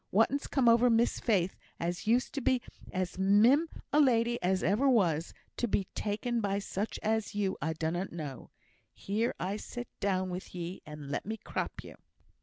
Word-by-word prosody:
Whatten's 235 +8 +2
come 265 -4 +2
over 235 +1 +6
Miss 230 +1 +3
Faith, 190 -5 +1 0.2
as 175 +4 -3
used 240 +3 +2
to 280 - -2
be 255 +1 +3 0.3
as 185 -1 -3
mim 225 +12 +5 0.2
a 300 - +5
lady 240 -4 +3
as 185 +1 +1
ever 240 +8 +3
was, 170 - +2 0.3
to 240 - 0
be 200 - +1
taken 230 +3 -1
by 200 -1 0
such 200 +1 -3
as 220 -1 0
you, 200 -2 0
I 160 +3 0
dunnot 165 +4 -2
know. 145 -7 -7 0.5
Here! 220 +4 -1 0.2
sit 245 +2 -7
down 185 -2 0
with 180 0 -6
ye, 175 +1 -5
and 150 -2 -8
let - - -3
me 220 +1 -3
crop - - -4
you." - - -11
205 Hz, 175 wpm, -31 LUFS, 180-235 Hz, 0.5 s, over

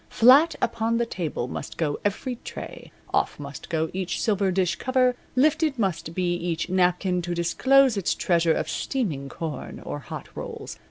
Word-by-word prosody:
Flat 275 +8 +6
upon 230 0 +1
the 235 - +1
table 165 - -3
must 140 - -6
go 150 -3 -1
every 230 +5 -2
tray, - - -8 0.2
off - - +1
must - - -8
go 160 -2 -1
each 185 -2 -2
silver 200 -3 +1
dish 180 -2 +1
cover, 255 -1 +2 0.2
lifted 305 +1 +3
must 170 -6 -2
be 180 -1 +1
each 175 -1 -2
napkin 180 0 +2
to 175 0 -3
disclose 260 +8 +4
its 195 - 0
treasure 170 -2 +2
of - - -2
steaming 160 - -2
corn 155 -4 -6
or 145 - -4
hot 125 - -8
rolls. - - -7
185 Hz, 165 wpm, -25 LUFS, 170-240 Hz, 0.2 s, Flat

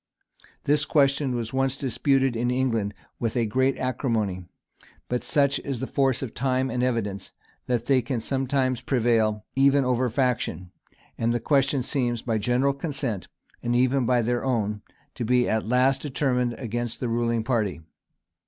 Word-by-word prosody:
This 145 +1 +2
question 140 -3 +2
was 115 0 -4
once 135 0 +1
disputed 135 -1 +1
in 120 +2 0
England 115 -5 0 0.2
with 115 +1 -1
great 130 +4 +1
acrimony; 110 -8 -1 0.6
but 125 0 -2
such 140 -1 +2
is 135 -4 -4
the 130 - -2
force 135 -1 +1
of 125 - -5
time 130 0 0
and 125 +1 -1
evidence, 115 -6 -2 0.3
that 120 -2 0
they 135 -1 +3
can 125 0 -2
sometimes 130 0 0
prevail 115 -4 +1
even 135 0 +4
over 125 0 +1
faction; 115 -7 -1 0.5
and 115 0 +1
the - - +1
question 135 0 +2
seems, 120 -4 -1
by 115 -3 0
general 125 +6 +2
consent, 135 - -3 0.3
and 120 0 0
even 130 0 +2
by 125 -1 +3
their 120 +1 0
own, 105 -5 -1 0.3
to 125 - -4
be 125 +1 +2
at 110 -1 0
last 130 +3 +3
determined 125 -4 0
against 120 -1 -3
the 125 - -2
ruling 115 -1 0
party. 110 -7 0
125 Hz, 155 wpm, -25 LUFS, 115-135 Hz, 0.6 s, even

